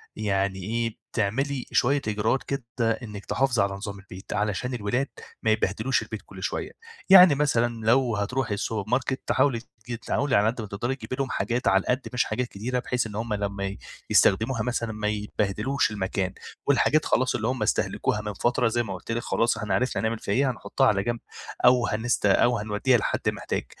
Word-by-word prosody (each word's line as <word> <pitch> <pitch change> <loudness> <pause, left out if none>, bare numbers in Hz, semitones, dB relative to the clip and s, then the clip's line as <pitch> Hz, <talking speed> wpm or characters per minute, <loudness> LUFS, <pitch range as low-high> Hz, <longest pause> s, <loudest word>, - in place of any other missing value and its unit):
يعني 100 -2 0
إيه، 115 +2 -2 0.2
تعملي 130 +6 -1
شوية 140 +3 +3
إجراءات 110 +5 0
كده 140 -2 -3 0.4
إنِّك 105 -3 -8
تحافظي 125 -5 +1
على 100 0 -1
نظام 100 0 -6
البيت 95 0 -9
علشان 105 +4 -1
الولاد 120 +4 -1 0.4
ما - - +3
يبهدلوش - - +1
البيت - - -6
كل - - -10
شوية. - - -3 0.4
يعني 185 -5 +9
مثلًا 120 -6 0
لو 120 0 +3
هتروحي 105 +1 -1
الsupermarket، 115 +6 -1 0.2
حاولي 130 -5 +2 0.3
جت 120 -1 -5
تحاولي 140 -1 +1
على 100 +1 +4
قد 115 +1 -1
ما 105 - -6
تقدري 120 +7 -2
تجيبي 130 - -6
لهم 135 -1 -2
حاجات 120 -1 -1
على 95 0 +5
القد 125 +6 0
مش 125 - +3
حاجات 125 -1 -2
كتيرة، 120 +4 -3
بحيث 125 -1 -1
إن 105 - -9
هم 110 0 -2
لمّا 100 -1 -2
ي 100 0 -4 0.3
يستخدموها 110 +3 +3
مثلًا 120 -1 -2
ما 105 0 -2
يبهدلوش 105 +5 -1
المكان، 95 -2 -2 0.3
والحاجات 150 +2 +3
خلاص 125 +1 +2
اللي 110 - -1
هم 125 -3 -1
استهلكوها 105 0 0
من 105 -1 -4
فترة 120 +3 +1
زي 120 +1 +1
ما 100 -4 -5
قُلت 95 +5 -7
لِك 115 - -1
خلاص 115 +1 +1
إحنا 105 -2 -2
عرفنا 130 +7 0
هنعمل 110 0 -1
فيها - - -2
إيه، 135 +1 +3
هنحُطّها 130 +2 0
على 100 -1 +2
جنب 120 +1 -2 0.5
أو 125 -1 +5
هنست 110 +1 0
أو 120 +4 +4
هنودّيها 110 +4 +2
لحد 105 - -1
محتاج. - - -3
115 Hz, 185 wpm, -26 LUFS, 105-125 Hz, 0.5 s, يعني